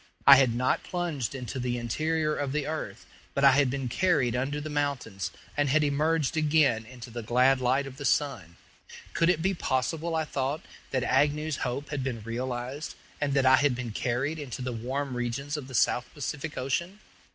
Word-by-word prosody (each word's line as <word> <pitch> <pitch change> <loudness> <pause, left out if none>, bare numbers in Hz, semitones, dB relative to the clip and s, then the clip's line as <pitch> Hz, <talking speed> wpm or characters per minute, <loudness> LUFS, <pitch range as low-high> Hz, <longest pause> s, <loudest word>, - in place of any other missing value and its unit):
I 140 - +11
had 130 -4 +3
not 125 +1 +1
plunged 160 -9 -3
into 130 0 -5
the 125 0 -1
interior 155 +6 0
of 140 -2 -2
the 150 -2 -1
earth, 135 -9 -5 0.3
but 140 - +1
I 135 - +9
had 140 0 +3
been 135 0 -2
carried 135 -4 +2
under 135 +4 -1
the 150 - -5
mountains, 140 - -2 0.3
and 145 -1 +1
had 155 +3 +3
emerged 150 +1 +1
again 150 -8 +3
into 120 -1 -10
the 120 +1 -5
glad 125 +4 +3
light 130 +3 +2
of 135 -1 -9
the 145 - -6
sun. 115 - 0 0.6
Could 165 - +3
it 165 -3 +2
be 190 +1 +2
possible, 160 +2 -1
I 160 -1 0
thought, 140 +1 -2 0.3
that 130 -2 0
Agnew's 145 +4 +1
hope 135 +3 -3
had 145 -3 -3
been 120 -5 -3
realized, 125 +5 -4 0.3
and 140 -1 0
that 135 -1 +3
I 130 0 +7
had 140 -2 +2
been 120 -2 -4
carried 130 +8 -1
into 130 -3 -5
the 125 -1 -3
warm 130 +4 -3
regions 125 +4 -2
of 145 -4 -5
the 130 - -7
South 120 +1 +2
Pacific 145 +2 -4
Ocean? 170 +9 -2
135 Hz, 195 wpm, -28 LUFS, 125-150 Hz, 0.6 s, I